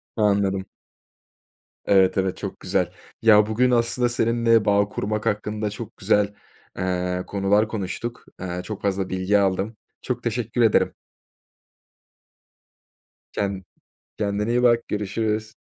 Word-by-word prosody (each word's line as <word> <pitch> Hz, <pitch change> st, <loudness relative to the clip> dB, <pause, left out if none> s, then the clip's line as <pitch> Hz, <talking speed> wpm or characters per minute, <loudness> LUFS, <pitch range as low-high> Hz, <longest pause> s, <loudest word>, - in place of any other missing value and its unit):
Anladım. 100 Hz, -3 st, +1 dB, 1.2 s
Evet, 95 Hz, -1 st, +4 dB
evet. 95 Hz, -1 st, 0 dB
Çok -, -, -6 dB
güzel. -, -, 0 dB, 0.3 s
Ya, 105 Hz, -2 st, +6 dB
bugün 125 Hz, +3 st, +2 dB
aslında 120 Hz, +1 st, +2 dB
seninle 115 Hz, -1 st, +2 dB
bağ 100 Hz, 0 st, +3 dB
kurmak 105 Hz, +1 st, -3 dB
hakkında 105 Hz, 0 st, -1 dB
çok 110 Hz, +2 st, -8 dB
güzel, 105 Hz, 0 st, +2 dB, 0.4 s
eee, 90 Hz, 0 st, -1 dB
konular 100 Hz, +2 st, +2 dB
konuştuk. 110 Hz, +3 st, -5 dB
Eee, 90 Hz, -1 st, -4 dB
çok 105 Hz, 0 st, -6 dB
fazla 95 Hz, -1 st, -1 dB
bilgi 95 Hz, +2 st, +2 dB
aldım. 100 Hz, +3 st, 0 dB, 0.2 s
Çok 125 Hz, -2 st, -3 dB
teşekkür 120 Hz, 0 st, -1 dB
ederim. 110 Hz, -2 st, +3 dB, 2.4 s
Ken 100 Hz, -2 st, -2 dB, 0.5 s
kendine 105 Hz, +1 st, -1 dB
iyi 125 Hz, +1 st, +2 dB
bak. 120 Hz, -1 st, +3 dB
Görüşürüz. 110 Hz, +1 st, -2 dB
105 Hz, 115 wpm, -23 LUFS, 95-115 Hz, 2.4 s, Ya